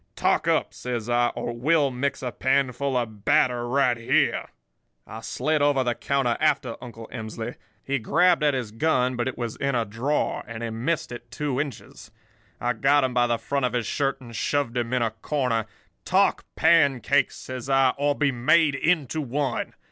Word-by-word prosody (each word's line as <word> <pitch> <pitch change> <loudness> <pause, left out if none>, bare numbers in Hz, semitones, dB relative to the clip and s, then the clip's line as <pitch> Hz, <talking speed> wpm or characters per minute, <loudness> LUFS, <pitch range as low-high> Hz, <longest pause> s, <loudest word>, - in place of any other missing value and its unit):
Talk - - +1
up,' - - +1
says 120 -2 -4
I, 120 0 +3
'or 120 - -3
we'll 140 +3 +2
mix 135 +2 -2
a 125 - -2
panful 130 +2 0
of 110 -4 -4
batter 120 +1 +2
right 130 -1 +3
here.' 115 - +1 0.6
"I 110 - -8
slid 150 +6 -1
over 145 -2 +3
the 120 -1 0
counter 130 -1 0
after 145 -6 +1
Uncle 115 -2 -9
Emsley. 110 -1 -5 0.3
He 140 0 -1
grabbed 175 +9 +3
at 145 -2 +3
his 120 -5 -3
gun, 125 0 +1
but 120 +1 -1
it 130 - -4
was 120 -2 -4
in 140 -1 -1
a 115 -2 +1
drawer, 120 +8 -1
and 115 -1 -6
he 115 - -3
missed 125 +9 -2
it 120 - -9
two 145 -3 -2
inches. 140 -7 -8 0.5
I 120 0 0
got 135 +5 +3
him 130 -1 0
by 120 0 +3
the 120 -1 +1
front 140 +5 -2
of 125 - -7
his 120 -2 -1
shirt 135 -1 -1
and 120 -3 -11
shoved 140 +1 -1
him 120 -1 -1
in 125 -2 +1
a 115 - 0
corner. 115 -1 -1 0.4
"'Talk - - +2
pancakes,' 140 -4 +3
says 130 0 -7
I, 135 -1 +4
'or 145 0 +1
be 140 -1 +1
made 150 +5 +3
into 155 0 0
one. 135 -1 -2
130 Hz, 185 wpm, -25 LUFS, 120-140 Hz, 0.6 s, I